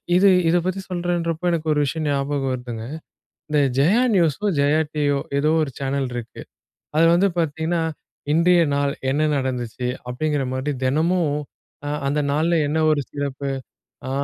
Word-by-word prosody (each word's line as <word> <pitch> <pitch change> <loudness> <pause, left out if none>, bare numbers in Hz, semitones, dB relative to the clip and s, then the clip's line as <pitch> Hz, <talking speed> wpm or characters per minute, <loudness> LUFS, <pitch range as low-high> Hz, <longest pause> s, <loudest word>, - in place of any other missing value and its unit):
இது 195 +2 +6 0.2
இத 175 - +4
பத்தி 185 +1 -1
சொல்றேன்றப்போ 175 -2 -2
எனக்கு 160 -2 -2
ஒரு 150 - +1
விஷயம் 155 +3 -2
ஞாபகம் 140 -1 -1
வருதுங்க. 120 -3 -5 0.6
இந்த 150 -1 +2 0.2
ஜெயா 185 - +4
நியூஸோ, 175 +1 +2
ஜெயா 145 +2 +3 0.2
டிவியோ 145 -2 +1 0.2
ஏதோ 150 +2 +2
ஒரு 140 - -4
சேனல் 135 0 -1
இருக்கு. 120 -2 -7 0.6
அது 165 +1 +5
வந்து 185 +4 +4
பார்த்தீங்கன்னா, 160 +1 0 0.5
"இன்றைய 170 +2 +4
நாள் 140 0 +1 0.2
என்ன 150 +3 +1
நடந்துச்சு." 125 -2 -2 0.2
அப்படிங்கிற 145 +3 -1
மாதிரி 130 +3 -2
தினமும் 160 +6 +2 0.6
அ - - -2 0.2
அந்த 145 +2 0
நாள்ல 160 +3 +2
என்ன 155 +2 0
ஒரு 150 -2 +2
சிறப்பு. 140 -1 -3 0.6
அ - - -3
150 Hz, 150 wpm, -22 LUFS, 140-170 Hz, 0.6 s, இது